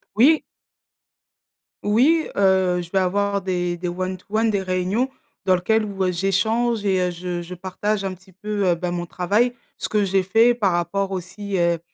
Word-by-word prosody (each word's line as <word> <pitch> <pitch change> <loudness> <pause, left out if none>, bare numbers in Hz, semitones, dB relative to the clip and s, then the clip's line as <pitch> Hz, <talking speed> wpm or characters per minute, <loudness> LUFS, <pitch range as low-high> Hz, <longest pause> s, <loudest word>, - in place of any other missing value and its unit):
Oui! 290 +8 +5 1.4
Oui, 275 +10 +3
heu, 190 -2 +3
je 170 - -9
vais 195 - +2
avoir 200 +2 0
des 180 -2 -1
des 175 +1 -4
one 185 +1 -3
to 185 - -17
one, 220 +2 +2
des 200 -2 0
réunions 185 +7 0 0.4
dans 185 - +4
lequel 220 +5 +1
où, 195 -2 -2
heu, 185 - +1
j'échange 210 +5 +1
et 190 -2 +2
heu, 180 0 0
je 175 0 -4
je 175 +1 -8
partage 195 +3 -2
un 190 - -2
petit 185 +1 -17
peu, 205 +2 -3
heu, 175 - +3
bah, 175 +1 -3
mon 175 0 -3
travail, 205 +8 +1 0.2
ce - - -4
que 210 -1 +2
j'ai 190 0 +2
fait 225 +6 +4
par 205 -5 +1
rapport 195 +3 -1
aussi, 190 +2 -4
heu, 170 -1 +2
190 Hz, 190 wpm, -22 LUFS, 180-210 Hz, 1.4 s, Oui